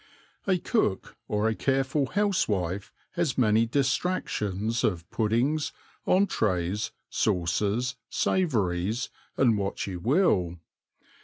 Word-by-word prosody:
A 190 -2 +3
cook 165 - -1
or 105 +1 +1
a 110 - +2
careful 135 +3 +1
housewife 105 - 0 0.2
has 170 -7 -1
many 115 -2 +4
distractions 115 - 0
of 85 -5 0
puddings, 120 +8 +1 0.3
entrées, 105 - +1 0.2
sauces, 105 +9 0
savouries, 110 - 0 0.3
and 115 -5 +4
what 100 0 -2
you 95 -3 -5
will. 100 - +2
115 Hz, 95 wpm, -27 LUFS, 100-140 Hz, 0.3 s, many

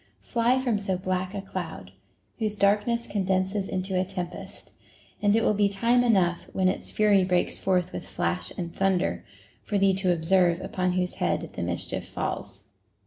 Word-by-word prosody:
Fly 240 +1 +2
from 240 -5 0
so 195 -2 -1
black 185 +1 -2
a 195 - -4
cloud, 175 - -6 0.5
whose 215 -1 -1
dark 205 +1 +3
ness 235 0 0
condenses 190 0 0
into 185 0 -1
a - - +1
tempest; 180 -2 -6 0.5
and 205 0 +4
it 225 - +3
will - - +3
be 205 0 +3
time 235 +5 +3
enough, 185 -7 +2
when 190 -1 +2
its 185 - -3
fury 205 -3 +4
breaks 180 -1 0
forth 185 -1 0
with - - -6
flash 85 -2 -1
and 170 -1 -5
thunder, 180 - +1 0.4
for 205 - -2
thee 195 -1 +4
to 190 -1 +1
observe 175 +1 +3
upon 185 -1 -1
whose 180 0 -1
head - - 0
the - - -5
mischief - - -2
falls. - - -4
190 Hz, 175 wpm, -26 LUFS, 180-205 Hz, 0.5 s, and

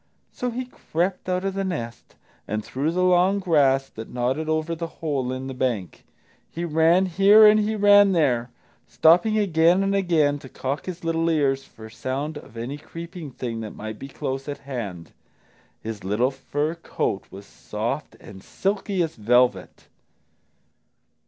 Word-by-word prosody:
So 250 - -3
he 250 +2 -4
crept 185 -6 -3
out 185 +1 -1
of 195 - -1
the 195 0 -2
nest 120 -12 -5 0.3
and 105 0 -3
through 140 +4 -2
the 180 +2 0
long 185 +2 +4
grass 140 -8 +2
that 110 0 -9
nodded 130 +6 -1
over 155 +1 0
the 165 0 -4
hole 140 -6 -3
in 130 0 -4
the 135 - -5
bank. 120 - -3 0.4
He 170 +1 -4
ran 165 +3 +3
here 195 +4 +6
and 210 0 +7
he 215 +1 0
ran 205 -1 +6
there, 125 -8 +1 0.4
stopping 180 +7 +4
again 175 -2 +3
and 195 0 0
again 160 -7 +2
to 135 - -12
cock 135 +6 -4
his 180 -1 -6
little 165 0 0
ears 140 -4 +1
for 110 0 -13
sound 135 +7 -4
of 115 - -15
any 130 +6 -5
creeping 165 0 -8
thing 120 -3 -5
that 110 -2 -7
might 110 0 -7
be 135 - -7
close 135 0 -5
at 145 - -4
hand. 105 -11 -6 0.7
His 110 -2 -6
little 105 +7 +1
fur 145 +3 -2
coat 165 - -3
was 100 +1 -11
soft - - -5
and 95 -1 -12
silky 195 -1 -1
as 160 - -4
velvet. 120 +3 +1
155 Hz, 165 wpm, -24 LUFS, 125-180 Hz, 0.7 s, and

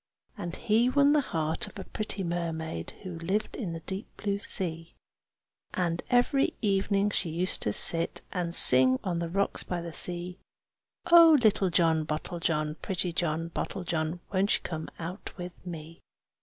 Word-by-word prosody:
And 175 -6 -5
he 230 +3 +2
won 285 +2 +4
the 300 - +4
heart 160 - -2
of - - -11
a 195 - -5
pretty 210 -1 -4
mermaid 165 - -3
Who 180 -3 -6
lived 190 +6 -2
in 185 -9 -4
the 165 - -6
deep 190 +5 -6
blue 200 -1 -2
sea. 165 -4 -4 0.8
And 170 -2 -1
every 245 +3 +2
evening 200 0 +1
she 175 - -1
used 175 +3 -2
to 105 - 0
sit 165 +10 +2
And 175 -2 -2
sing 130 0 +7
on 175 -3 -1
the 170 -1 -3
rocks 200 +3 -1
by 180 - -4
the 170 -1 -7
sea, 180 +2 -1 0.7
"Oh! 335 -2 +9
little 205 -3 +3
John 165 -2 +2
Bottlejohn, 155 0 -2
pretty 180 -3 -1
John 165 -1 -1
Bottlejohn, 170 -2 -3
Won't 195 +2 +3
you - - -3
come 160 -2 -5
out 175 +4 -6
to 180 0 -6
me?" 165 -1 -8
175 Hz, 160 wpm, -28 LUFS, 165-200 Hz, 0.8 s, Oh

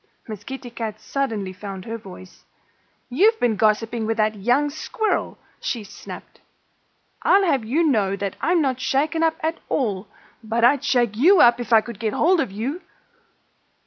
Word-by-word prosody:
Miss 210 -3 -7
Kitty 265 0 -8
Cat 220 -2 -5
suddenly 220 -9 -3
found 195 -1 -8
her 230 0 -5
voice. 185 -2 -13 0.6
"You've 415 - +3
been 235 -3 +2
gossiping 220 +2 +1
with 225 0 -1
that 215 0 +2
young 245 +8 +1
squirrel!" 440 +9 -2 0.2
she 230 -4 -3
snapped. 200 - -11 0.8
"I'll 390 0 +4
have 275 -9 +1
you 275 +10 +1
know 210 -10 +2
that 200 -1 -4
I'm 340 -1 +2
not 260 -2 -1
shaken 300 +5 0
up 325 -1 +2
at 320 +1 -2
all. 205 -7 -1 0.4
But 225 +1 -1
I'd 250 +3 +4
shake 240 -5 +1
you 355 - +6
up 240 -2 +6
if 240 -1 -6
I 225 -1 +7
could 230 -2 -9
get 220 -2 -2
hold 355 +3 +3
of - - -3
you!" 255 - -4
235 Hz, 170 wpm, -22 LUFS, 215-290 Hz, 0.8 s, I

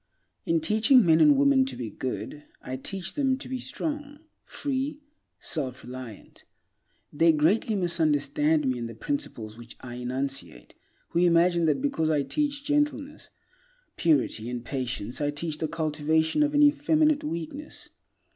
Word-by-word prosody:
In 330 -1 +1
teaching 230 - +4
men 160 -1 +5
and 295 -2 +6
women 280 -1 +5
to 265 - -4
be 115 -4 -5
good, 135 +5 -5
I 130 - -6
teach 185 +7 -5
them 270 -3 +1
to 275 - -8
be 260 -1 -4
strong, 290 +2 -5 0.2
free, 280 +1 -3 0.4
self 130 -5 -4
reliant. 125 -4 -10 0.7
They 165 +3 +4
will 160 - +4
greatly 205 +8 +2
misunderstand 155 -4 +1
me 130 -1 0
and 115 -1 -4
the 115 - -9
principles 115 - -4
which 120 -1 -12
I 120 -1 -8
enunciate 130 - -5 0.4
who - - 0
imagine 170 0 +4
that 155 - +1
because 160 - 0
I 150 -3 +2
teach 285 - -2
gentleness, 295 0 -1 0.7
purity, 135 -8 +1
and 120 -1 -5
patience 125 -2 -4
I 145 - +1
teach 150 +1 -4
the 160 - -1
cultivation 160 - 0
of 295 0 +2
an 295 - +6
effeminate 295 +1 +3
weakness. 170 - -6
165 Hz, 150 wpm, -27 LUFS, -, 0.7 s, and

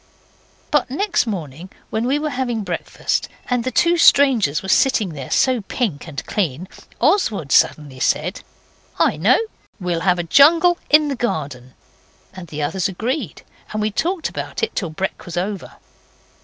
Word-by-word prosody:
But 295 -3 +2
next 340 - 0
morning 170 -4 -5 0.2
when 220 +2 -1
we 275 +3 +2
were 300 0 -2
having 245 -4 -2
breakfast, 180 -3 -2 0.2
and 245 -1 +1
the 255 - -1
two 345 +6 +2
strangers 240 - +4
were - - -6
sitting 220 -1 +3
there 140 -5 -8
so 255 -3 +2
pink 195 - -3
and 150 -3 -6
clean, 175 -3 -2 0.3
Oswald 230 - +1
suddenly 145 -4 +2
said 165 +8 0 0.6
'I - - +2
know; - - +4 0.4
we'll 180 -3 -1
have 180 +1 +2
a 175 - -2
jungle 330 - +5
in 300 0 +5
the 280 - -2
garden.' 140 - -4 0.6
And 185 -2 -9
the 150 -1 -4
others 180 +5 -1
agreed, 225 - -4 0.3
and 215 - -2
we 215 0 0
talked 340 - -1
about - - -6
it 455 - -1
till 180 - -2
brek 190 +5 -4
was 175 0 -6
over. 195 +1 -3
205 Hz, 160 wpm, -20 LUFS, 165-270 Hz, 0.6 s, jungle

